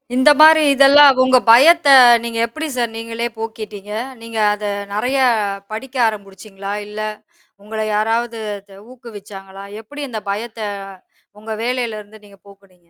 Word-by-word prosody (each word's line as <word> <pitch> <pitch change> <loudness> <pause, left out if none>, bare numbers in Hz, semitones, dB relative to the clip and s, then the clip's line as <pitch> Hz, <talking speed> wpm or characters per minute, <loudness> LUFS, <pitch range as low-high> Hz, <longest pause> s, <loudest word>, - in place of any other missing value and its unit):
இந்த 260 +4 +4
மாரி 315 0 +7
இதெல்லாம் 275 0 +6
உங்க 255 0 +4
பயத்தை 285 +4 +6 0.3
நீங்க 230 -1 -5
எப்படி 310 +7 -7
சார் 235 -2 -2
நீங்களே 230 +1 -5
போக்கீட்டீங்க? 215 -2 -8 0.3
நீங்க 230 -1 -7
அதை 210 0 -5 0.2
நெறைய 250 +6 -1 0.5
படிக்க 255 +5 -8
ஆரம்புச்சீங்களா? 200 -1 -8
இல்ல, 210 +1 -9 0.6
உங்களை 220 +1 -5
யாராவது 230 +2 -2 0.2
இது 195 -1 -18 0.2
ஊக்குவிச்சாங்களா? 200 -5 -12 0.2
எப்படி 290 +6 -10
அந்த 220 -3 -6
பயத்தை 220 0 -6 0.7
உங்க 220 +1 -10
வேலையிலருந்து 220 -4 -5
நீங்க 200 -1 -19
போக்குனீங்க? 190 -3 -22
225 Hz, 125 wpm, -17 LUFS, 205-250 Hz, 0.7 s, மாரி